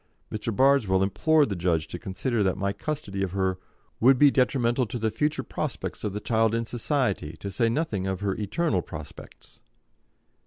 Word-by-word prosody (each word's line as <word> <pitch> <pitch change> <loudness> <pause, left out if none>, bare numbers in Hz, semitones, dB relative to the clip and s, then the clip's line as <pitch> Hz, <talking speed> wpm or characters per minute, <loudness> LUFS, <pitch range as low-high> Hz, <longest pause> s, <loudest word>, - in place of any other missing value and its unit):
Mr. 110 +1 -3
Bardswell 115 -6 +3
implored 150 +8 +3
the 100 - -2
judge 85 -3 0
to 90 - -6
consider 110 +6 -2
that 95 -2 +1
my 100 +1 -1
custody 100 -4 -4
of 95 -2 -2
her 95 -1 0 0.4
"would 130 +3 +6
be 145 +1 +6
detrimental 125 -2 +2
to 120 +3 -4
the 110 -1 0
future 150 +5 -1
prospects - - -4
of 105 - -1
the 105 - -4
child 115 0 +1
in 115 0 -1
society, 120 - -1
to 100 - -6
say 115 +3 +1
nothing 115 - -1
of 95 0 -3
her 100 -2 0
eternal 105 - 0
prospects." 75 -3 -11
110 Hz, 180 wpm, -26 LUFS, 95-130 Hz, 0.4 s, would